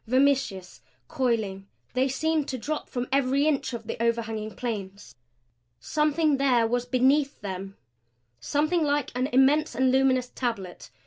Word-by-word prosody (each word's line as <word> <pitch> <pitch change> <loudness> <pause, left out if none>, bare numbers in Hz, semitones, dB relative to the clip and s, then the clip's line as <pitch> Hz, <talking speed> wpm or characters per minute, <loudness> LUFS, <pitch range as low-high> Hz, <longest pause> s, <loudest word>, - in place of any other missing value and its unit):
Vermiceous, 255 -8 +1 0.3
coiling, 230 -10 -1 0.3
they 255 +2 +2
seemed 310 +2 0
to 260 - -3
drop 300 +5 -4
from 245 -1 -3
every 275 +1 +2
inch 300 -4 0
of 230 -2 -6
the 215 - -5
overhanging 225 -2 -1
planes. 205 -5 -5 0.7
Something 300 -1 +1
there 255 -4 +3
was 245 +2 -1
beneath 270 +3 +2
them 195 0 -6 0.6
something 310 - 0
like 290 -2 0
an 250 +2 0
immense 270 +2 +3
and 260 +1 +3
luminous 260 -1 +2
tablet. 225 -8 -4
255 Hz, 135 wpm, -26 LUFS, 225-280 Hz, 0.7 s, there